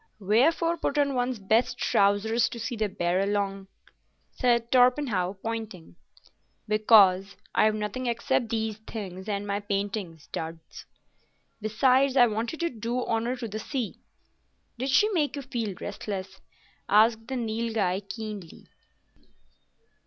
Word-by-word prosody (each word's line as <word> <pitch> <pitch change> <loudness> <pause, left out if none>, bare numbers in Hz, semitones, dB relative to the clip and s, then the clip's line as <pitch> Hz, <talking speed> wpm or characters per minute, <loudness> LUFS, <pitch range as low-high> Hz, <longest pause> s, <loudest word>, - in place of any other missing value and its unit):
"Wherefore 305 - +2
put 295 -2 -2
on 285 -1 +2
one's 250 -1 -1
best 220 +5 +1
trousers 205 +3 +2
to 235 - -7
see 240 - -3
the 215 -2 -1
Barralong?" 195 +2 -1 0.6
said 235 -2 +1
Torpenhow, 245 -7 +3
pointing. 220 -7 -5 0.7
"Because 205 -3 +5 0.2
I've 215 0 +3
nothing 215 +4 -3
except 235 0 0
these 220 -1 -2
things 190 -2 -6
and 200 0 -2
my 200 0 -1
painting 200 -4 -3
duds. 160 0 -7 0.7
Besides, 255 +5 +3
I 245 - +8
wanted 230 +8 -3
to 340 - +1
do 235 +2 -3
honour 230 +2 -1
to 245 -2 -5
the 215 +1 -5
sea." 245 -1 -4 0.8
"Did 260 +2 -2
She 415 +10 +5
make 315 -9 0
you 280 - -5
feel 230 -6 -3
restless?" 190 -2 -6 0.5
asked 225 +2 +4
the 265 - -3
Nilghai, 220 -5 -1
keenly. 205 -3 -8
220 Hz, 125 wpm, -27 LUFS, 200-245 Hz, 0.8 s, I